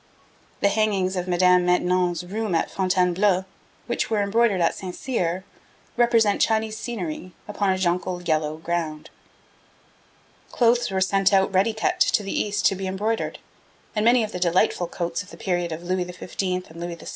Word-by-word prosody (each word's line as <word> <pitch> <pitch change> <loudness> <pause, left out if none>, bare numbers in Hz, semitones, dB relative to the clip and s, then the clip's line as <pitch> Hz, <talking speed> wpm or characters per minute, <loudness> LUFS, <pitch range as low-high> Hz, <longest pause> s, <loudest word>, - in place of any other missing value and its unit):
The 200 - +4
hangings 200 -3 +1
of 180 0 -3
Madame 180 0 +4
de - - -2
Maintenon's 180 0 +1
room 210 0 -2
at 165 - 0
Fontainebleau, 185 0 +2 0.4
which 240 - -2
were 215 -2 +1
embroidered 210 -1 +2
at 170 - +2
St. 185 -2 -7
Cyr, 185 -8 -2 0.5
represent 230 -4 +3
Chinese 220 -1 +1
scenery 185 -6 -5
upon 205 -1 -1
a 190 - +2
jonquil 180 0 -1
yellow 155 -2 0
ground. 160 -2 -4 1.4
Clothes 240 0 +2
were 190 -1 -1
sent 195 +1 +3
out 195 0 +3
ready 195 +4 +3
cut 220 - -1
to 210 - +3
the 195 - -4
East 205 0 -1
to - - +5
be 190 0 -4
embroidered, 210 +4 -2 0.6
and 210 - +1
many 235 +1 +5
of 215 - -4
the 180 - -5
delightful 175 0 +2
coats 170 0 -3
of 200 - -12
the - - -12
period 175 -2 -1
of 160 +2 -6
Louis 180 +1 -1
XV. 180 0 -11 0.4
and 165 - -13
Louis 175 0 -4
XVI. 165 - -10
185 Hz, 175 wpm, -24 LUFS, 175-210 Hz, 1.4 s, to